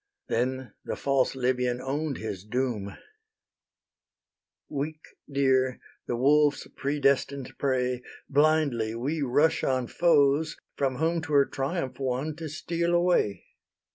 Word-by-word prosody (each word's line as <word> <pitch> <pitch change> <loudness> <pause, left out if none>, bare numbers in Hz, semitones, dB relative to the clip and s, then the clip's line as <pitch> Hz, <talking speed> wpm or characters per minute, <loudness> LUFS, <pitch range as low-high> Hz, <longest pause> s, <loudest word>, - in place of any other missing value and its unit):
Then 125 -1 -1
the - - -3
false 135 -1 +1
Libyan 125 -1 0
own'd 140 +2 -2
his 100 -4 -5
doom: 110 -3 -2 1.7
"Weak 155 +2 -4 0.3
deer, 130 -2 +2 0.3
the 120 - -1
wolves' 145 +3 +3
predestined 140 -1 0
prey, 125 -2 0 0.3
Blindly 145 -6 +2
we 145 +7 -2
rush 145 +4 +2
on 130 -1 +1
foes, 150 0 +3 0.2
from 135 -2 0
whom 165 +4 0
'Twere 145 -3 +3
triumph 135 0 -3
won 135 +3 -2
to 160 -2 -5
steal 170 +2 -1
away. 175 - +2
135 Hz, 110 wpm, -27 LUFS, 125-150 Hz, 1.7 s, wolves